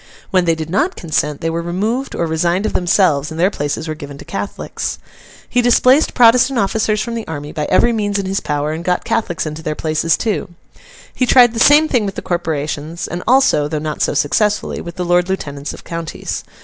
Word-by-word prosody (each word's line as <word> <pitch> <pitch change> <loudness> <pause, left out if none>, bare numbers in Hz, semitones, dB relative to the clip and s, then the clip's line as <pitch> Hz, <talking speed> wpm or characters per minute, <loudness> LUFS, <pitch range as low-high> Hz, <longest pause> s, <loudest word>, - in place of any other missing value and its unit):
When 185 -3 +3
they 165 -1 +2
did 160 0 -6
not 305 - +1
consent, 150 -3 -2
they 165 - -1
were 165 +1 -2
removed, 210 +10 -2
or 170 - 0
resigned 170 +4 0
of - - -2
themselves, 170 -5 +2
and 160 0 -7
their 185 +4 +3
places 145 +1 -3
were 155 - -2
given 145 -2 -9
to - - -12
Catholics. 200 0 -4 0.5
He 245 - +1
displaced 255 +4 +4
Protestant 250 +2 +5
officers 215 0 +1
from 235 - -4
the 230 -2 -5
army, 145 -2 -6
by 150 -1 -3
every 235 +8 +3
means 205 -2 -1
in 200 - -2
his 195 +1 -1
power, 150 0 -2
and 160 +2 -5
got 180 0 0
Catholics 175 -8 -1
into 155 +1 -5
their 155 -1 -3
places 155 +1 0
too. 210 -3 -2 0.6
He 255 - 0
tried 245 -2 +6
the 225 - -3
same 295 +5 +6
thing 240 -8 +1
with 195 - -5
the - - -6
corporations, 160 -1 -3
and 175 - -5
also 250 - +4
(though 155 +1 -3
not 150 0 -4
so - - +1
successfully) 210 +9 0
with 170 0 -8
the 180 - -3
Lord 175 +1 +2
Lieutenants 145 -6 -4
of - - -11
counties. 165 -2 -5
175 Hz, 215 wpm, -17 LUFS, 155-215 Hz, 0.6 s, tried